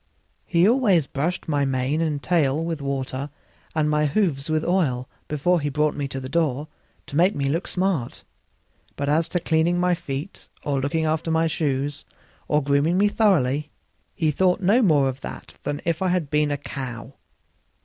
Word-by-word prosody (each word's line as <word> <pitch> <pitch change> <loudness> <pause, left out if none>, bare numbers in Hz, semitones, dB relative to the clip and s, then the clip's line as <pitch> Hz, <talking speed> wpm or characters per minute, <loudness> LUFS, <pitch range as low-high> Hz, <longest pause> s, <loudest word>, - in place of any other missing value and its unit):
He 170 +2 +4
always 215 - +3
brushed 155 +7 -3
my 145 -2 +1
mane 135 +3 0
and 150 -3 -1
tail 160 -3 +1
with 165 -3 -3
water 140 0 -3 0.5
and 155 -1 +2
my 150 0 +2
hoofs 145 -4 0
with 155 0 0
oil 140 -9 +1 0.2
before 160 +4 +1
he 145 - -1
brought 150 +1 +1
me 145 -1 -3
to 135 0 -5
the 130 - -6
door, 150 -1 0 0.4
to - - -8
make 180 +6 +4
me 140 - -2
look 160 +6 -1
smart; 180 -9 -1 0.7
but 140 - -3
as 155 +3 +2
to 175 - 0
cleaning 165 +1 +1
my 180 0 +3
feet 150 +2 -6
or 140 -2 0
looking 150 +4 0
to 160 +1 0
my 160 0 +2
shoes, 145 -3 -1 0.4
or 150 -1 +2
grooming 145 +5 +2
me 205 +1 +4
thoroughly, 150 - +2 0.5
he 155 -2 +1
thought 180 +4 +2
no 205 +6 +4
more 150 - +4
of 130 +1 -4
that - - -9
than 145 +1 -3
if 165 0 0
I 190 - +2
had 175 -5 0
been 150 0 +2
a 145 - -1
cow. 130 -3 -7
150 Hz, 180 wpm, -24 LUFS, 140-170 Hz, 0.7 s, He